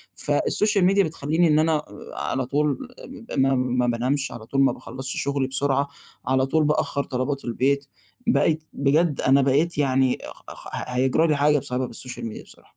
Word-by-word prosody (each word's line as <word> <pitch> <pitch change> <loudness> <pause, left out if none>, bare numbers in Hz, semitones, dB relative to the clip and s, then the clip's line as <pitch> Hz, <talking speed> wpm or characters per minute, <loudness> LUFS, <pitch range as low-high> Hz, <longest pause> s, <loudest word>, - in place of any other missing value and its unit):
فالسوشيال 205 -3 +1
ميديا 195 +2 +4
بتخلّيني 160 +1 0
إن 150 -1 +4
أنا 155 -1 +2 0.3
على 130 -1 -2
طول 145 +3 0 0.5
ب - - -2
ما 135 0 +3
ما 125 -1 0
بانامش 130 +4 0
على 110 -2 -9
طول، 135 +4 0
ما 135 - +4
باخلّصش 130 +1 -5
شُغلي 140 -1 -1
بسرعة، 140 +1 0 0.4
على 130 0 +2
طول 155 +4 +1
بأخّر 145 -1 0
طلبات 135 +2 -3
البيت. 135 +4 0 0.4
بقيت، 160 -9 +2
بجد 145 +2 +1
أنا 135 +1 +4
بقيت 145 +5 +1
يعني 130 -2 +2 0.3
خخ - - -10 0.2
هيجرى 130 +6 +2
لي 150 - +2
حاجة 145 0 +3
بسبب 130 -2 -3
السوشيال 125 +1 -6
ميديا 110 - -7
بصراحة. - - -16
140 Hz, 165 wpm, -24 LUFS, 130-150 Hz, 0.5 s, ميديا